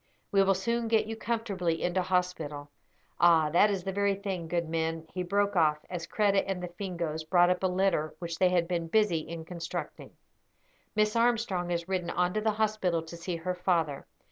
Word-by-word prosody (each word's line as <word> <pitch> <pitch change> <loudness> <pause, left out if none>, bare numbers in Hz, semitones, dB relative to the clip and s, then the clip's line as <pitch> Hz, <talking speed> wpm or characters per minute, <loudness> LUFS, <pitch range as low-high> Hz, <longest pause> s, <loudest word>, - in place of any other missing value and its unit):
We 195 - +4
will 195 0 +3
soon 235 +5 -1
get 225 -1 +3
you 225 +1 -5
comfortably 205 -8 -2
into 180 +1 +1
hospital. 170 -6 -2 0.5
Ah, 165 -3 +5
that 190 +6 +5
is 195 -3 -2
the 195 - -2
very 200 0 +1
thing; 190 -4 -4
good 170 0 -1
men," 165 0 -2
he 185 - -2
broke 200 +3 0
off, 155 -3 +4
as 170 -2 -4
Kreta 200 -1 +2
and 190 -2 -3
the 180 - -4
Fingoes 170 -4 -4
brought 175 +2 +4
up 180 - -1
a 190 - +2
litter 180 -4 0
which 170 -1 -5
they 185 - +5
had 175 -2 +1
been 170 -2 -2
busy 205 -2 +2
in 160 +1 -7
constructing. 170 0 -6 0.8
"Miss 215 +1 +2
Armstrong 230 -7 +1
has 170 0 -2
ridden 185 -2 -2
on 180 0 0
to 215 - 0
the 220 - +1
hospital 210 -6 0
to 165 +1 -9
see 170 +1 -4
her 175 +2 -3
father. 170 -6 -1
180 Hz, 195 wpm, -29 LUFS, 170-200 Hz, 0.8 s, Ah